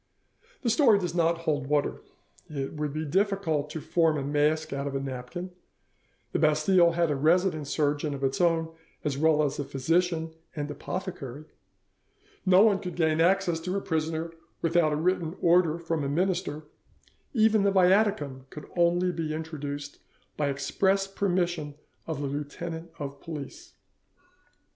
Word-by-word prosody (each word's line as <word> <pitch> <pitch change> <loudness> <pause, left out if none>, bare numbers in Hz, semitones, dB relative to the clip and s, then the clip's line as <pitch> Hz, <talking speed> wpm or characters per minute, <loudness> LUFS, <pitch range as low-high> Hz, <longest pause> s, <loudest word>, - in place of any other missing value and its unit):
This 235 -3 +2
story 235 -6 +5
does 180 -4 -2
not 170 -1 +1
hold 145 -4 -1
water: 145 0 0 0.5
it 140 -3 -4
would 150 -1 -3
be 155 +2 -3
difficult 170 -3 0
to 160 - -5
form 160 0 +2
a 140 - -2
mask 150 +2 +1
out 140 0 -3
of 140 - -4
a - - 0
napkin; 135 +7 -6 0.8
the - - 0
Bastille 170 +3 +4
had 170 -2 +1
a - - +1
resident 160 +1 +2
surgeon 145 0 0
of 135 - -7
its 135 +5 0
own 165 -1 +2 0.3
as 145 -3 -1
well 155 +1 +3
as 145 -1 -1
a - - 0
physician 160 +4 0 0.2
and 145 -1 -3
apothecary; 150 -3 -6 1.0
no 185 +2 +7
one 205 -3 +4
could 180 -3 -6
gain 160 -2 +2
access 180 -1 +2
to 180 +4 -2
a - - -2
prisoner 160 -1 -2 0.3
without 165 -1 +3
a - - +1
written 170 +1 0
order 170 -2 +4
from 165 -2 -2
a 140 - -1
minister, 175 -1 -1 0.7
even 220 -1 +4
the 200 - +3
Viaticum 185 -9 +2
could 150 +1 -9
only 175 +1 +3
be 160 -2 -3
introduced 145 -2 -6 0.4
by 150 - 0
the - - +1
express 195 +7 +1
permission 175 -6 -1 0.3
of 155 -3 -3
the 140 - -1
lieutenant 160 +4 -5
of 140 -1 -6
police. 165 - -8
160 Hz, 160 wpm, -28 LUFS, 145-180 Hz, 1.0 s, no